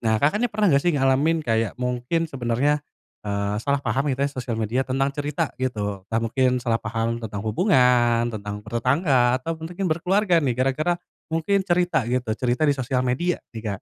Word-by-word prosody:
Nah, 110 -2 +1
Kakak 145 - +2
nih 245 - +2
pernah 210 0 0
nggak 140 0 +3
sih 175 - +3
ngalamin 135 +4 +2
kayak 115 -2 0
mungkin 125 +6 -1
sebenarnya, 135 +3 0 0.5
eee, 100 0 -1
salah 140 +3 0
paham 140 +2 0
gitu 135 0 0
ya 140 - -1
sosial 125 -4 -4
media, 115 +3 0
tentang 135 +2 0
cerita 150 +2 -2
gitu. 105 -6 -2
Entah 115 0 0
mungkin 125 +2 +1
salah 115 -2 +1
paham 115 +1 -2
tentang 105 -2 -5
hubungan, 120 - +3
tentang 105 -1 -6
bertetangga, 125 - +2
atau 165 - -2
mungkin 175 +4 -5
berkeluarga 180 +2 +2
nih, 130 -5 0
gara-gara 135 +7 +1 0.3
mungkin 165 +5 +1
cerita 175 -8 +1
gitu, 125 -2 -1
cerita 125 +4 +1
di 145 - +4
sosial 130 -1 -1
media 170 +9 0 0.2
nih, 115 - -6
Kak. 110 - -8
130 Hz, 180 wpm, -23 LUFS, 115-155 Hz, 0.5 s, di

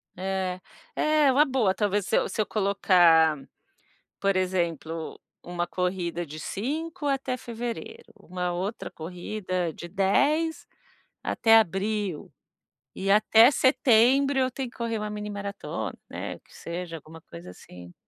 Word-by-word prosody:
É, 185 0 -2 0.4
é 305 -3 +3
uma 290 +4 +5
boa 245 -8 +1
talvez 205 -1 0
se - - +1
eu - - +1
se 215 - -1
eu 210 - 0
colocar, 175 -6 +4 0.8
por 195 -1 +1
exemplo, 170 -3 -2 0.2
uma 175 0 -3
corrida 180 -2 -2
de 155 0 -9
5, 295 - -4
até 270 -2 -1
fevereiro, 240 - -7
uma 180 -1 -4
outra 195 +6 -4
corrida, 180 +1 -4
de 170 - -9
10 280 - +1 0.6
até 225 0 +4
abril, 200 -3 -1 0.6
e 195 +1 -3
até 220 +3 +6
setembro, 265 +1 +4
eu 255 -1 +2
tenho 260 -1 -4
que - - -22
correr, 230 -1 -2
uma 210 0 -4
mini-maratona, 205 -1 -5 0.2
né, - - -6
que - - -24
seja 170 0 -6
alguma 160 +1 -13
coisa, 90 - -11
assim. 90 -1 -13
200 Hz, 135 wpm, -26 LUFS, 175-235 Hz, 0.8 s, até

